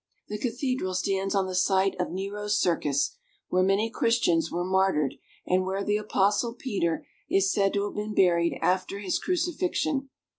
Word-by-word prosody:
The 210 0 -4
cathedral 250 -5 -2
stands 195 +1 0
on 195 -1 +2
the 185 - -5
site 190 +1 +2
of 180 - -2
Nero's 205 +3 -2
Circus, 150 - +1 0.3
where 185 - +2
many 195 +4 +2
Christians 175 -10 +2
were 175 +1 -1
martyred, 190 -7 +2 0.3
and 185 +1 +2
where 190 +1 -2
the 205 +1 +1
Apostle 210 +2 +1
Peter 195 -10 -2 0.2
is 195 0 +3
said 195 -1 +2
to 200 -1 +1
have 205 - -5
been 210 0 -4
buried 170 -2 +3
after 185 +2 +1
his 195 -3 -1
crucifixion. 330 -5 -1
195 Hz, 160 wpm, -27 LUFS, 185-210 Hz, 0.3 s, is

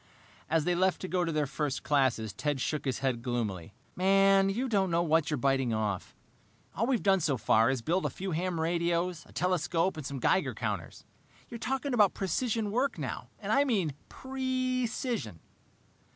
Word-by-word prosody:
As 160 -1 +2
they 180 - +1
left 185 +1 +2
to 185 - -4
go 180 -1 0
to 165 - -1
their 155 -1 +1
first 140 0 -3
classes, 130 -8 +1
Ted 145 -2 -2
shook 150 +4 -2
his 130 -2 0
head 125 -3 0
gloomily. 105 -8 -3 0.2
"Man, 195 +1 +4
you 240 +7 -1
don't 195 -5 +1
know 170 0 +2
what 160 -1 +2
you're 150 - 0
biting 135 -3 +1
off! 105 -4 -3 0.6
All 225 +5 0
we've 255 -3 +1
done 195 -1 +4
so 145 -5 0
far 115 +1 +3
is 130 -3 -1
build 180 +7 +1
a - - -3
few 190 0 -5
ham 175 +1 -1
radios, 170 +1 0
a - - -17
telescope, 180 -1 0
and 155 - -5
some 140 0 -5
Geiger 185 +9 +1
counters. - - -4 0.4
You're 235 - -7
talking 270 +3 -2
about 210 -5 +4
precision 210 +3 -1
work 255 +5 0
now, - - -5
and - - -4
I 280 - +5
mean 195 - 0 0.2
pree 260 -1 -2
cision!" 225 - -3
175 Hz, 185 wpm, -30 LUFS, 140-200 Hz, 0.6 s, I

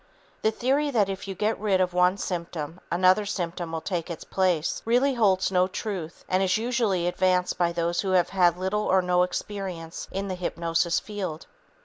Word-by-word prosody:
The 220 - +3
theory 270 +6 +1
that 215 -7 +2
if 195 0 -5
you 195 - -4
get 215 +4 0
rid 200 -3 +2
of 180 -1 +1
one 180 +2 +3
symptom 170 -3 -4
another 185 +4 +4
symptom 175 -4 -3
will 165 -1 -3
take 175 -2 -3
its 170 - -6
place 180 -4 0
really 250 +4 +3
holds 195 -6 +2
no 180 -1 +3
truth 185 -4 -5
and 185 +1 +1
is 190 +1 +2
usually 225 -6 0
advanced 180 0 +1
by 170 -1 +2
those 170 0 0
who 195 - -3
have 180 -2 +3
had 175 -3 +3
little 190 +3 -1
or 190 0 +3
no 180 0 +2
experience 180 -3 -4
in 195 +1 -3
the 190 - -3
hypnosis 170 -1 0
field. 190 -7 -5
185 Hz, 190 wpm, -26 LUFS, 175-200 Hz, -, another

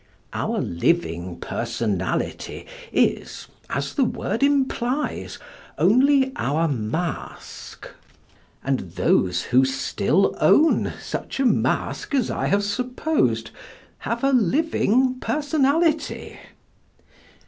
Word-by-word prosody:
Our - - -1
living 85 - -1
personality 110 -6 -3 0.3
is, - - 0 0.2
as 140 +1 -2
the 275 - +2
word 230 -1 -2
implies, 275 -1 0 0.4
only 265 +6 +4
our 160 +4 +1
mask, 145 +6 -5 0.8
and 135 -1 0
those 90 0 +1
who 130 +1 +3
still 135 +6 +1
own 320 +2 +4
such - - -5
a 270 - +2
mask 270 +3 0
as 255 -4 +1
I - - -1
have 200 +1 +2
supposed 205 - -1 0.5
have 235 +3 -3
a 275 - +3
living 255 - +2
personality. 305 +2 0
210 Hz, 95 wpm, -23 LUFS, -, 0.8 s, only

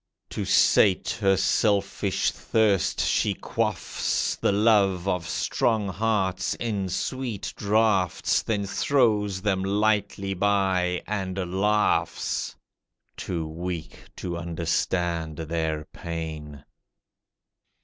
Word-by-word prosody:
To - - -3
sate 95 -3 +4
her 95 -1 +4
selfish 100 0 +1
thirst 105 -5 +1
she 100 -2 +1
quaffs 105 -5 -1
The - - +1
love 100 -3 +3
of 90 -3 -1
strong 110 -4 0
hearts 95 -2 0
in 105 -5 -2
sweet 120 +2 -3
draughts, 105 -3 +2
Then 105 -3 -1
throws 105 -5 +1
them 95 -3 +1
lightly 100 -1 0
by 95 -2 +1
and 95 -3 -3 0.2
laughs, 105 +2 0 0.6
Too 85 -3 -4
weak 85 +1 -6
to 85 -2 -4
understand 85 -1 -1
their 80 -1 -2
pain. 80 -4 -7
95 Hz, 95 wpm, -25 LUFS, 85-105 Hz, 0.6 s, sate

